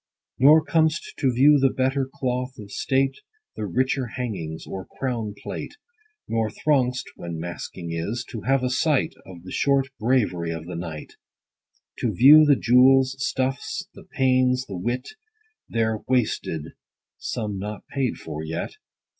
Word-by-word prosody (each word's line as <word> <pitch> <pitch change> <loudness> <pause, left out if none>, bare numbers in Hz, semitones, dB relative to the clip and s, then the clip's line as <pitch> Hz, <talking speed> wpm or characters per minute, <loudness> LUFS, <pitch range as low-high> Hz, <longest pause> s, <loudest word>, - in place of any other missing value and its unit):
Nor 150 +4 +7
com'st 160 0 +1
to 135 -3 +2
view 140 +4 +5
the 135 0 +4
better 130 +1 0
cloth 130 -1 -3
of 100 -2 -10
state, 135 +3 0 0.4
The 105 - -3
richer 130 +6 0
hangings, 90 -11 -4
or 95 -1 -7
crown 115 -6 -2
plate; - - -6 0.5
Nor 115 -1 0
throng'st 130 -3 +1
(when 85 -1 -6
masquing 85 0 -6
is) 100 +9 -3
to 115 - -5
have 135 +3 +1
a 125 - 0
sight 145 +1 +1
Of 90 -2 -11
the 95 - -9
short 135 -1 +2
bravery 105 -8 +1
of 80 -1 -5
the 90 - -6
night; 80 -3 -7 0.8
To 120 - 0
view 150 - +8
the 145 -1 +6
jewels, 130 +2 +5
stuffs, 130 0 -2
the - - -14
pains, 130 -1 +2
the 100 - -7
wit 120 +8 -2 0.6
There 110 -1 0
wasted, 105 - -1 0.5
some 105 -3 -3
not 105 +1 -6
paid 135 -3 -1
for 75 +1 -6
yet 80 +1 -5
125 Hz, 145 wpm, -24 LUFS, 100-135 Hz, 0.8 s, view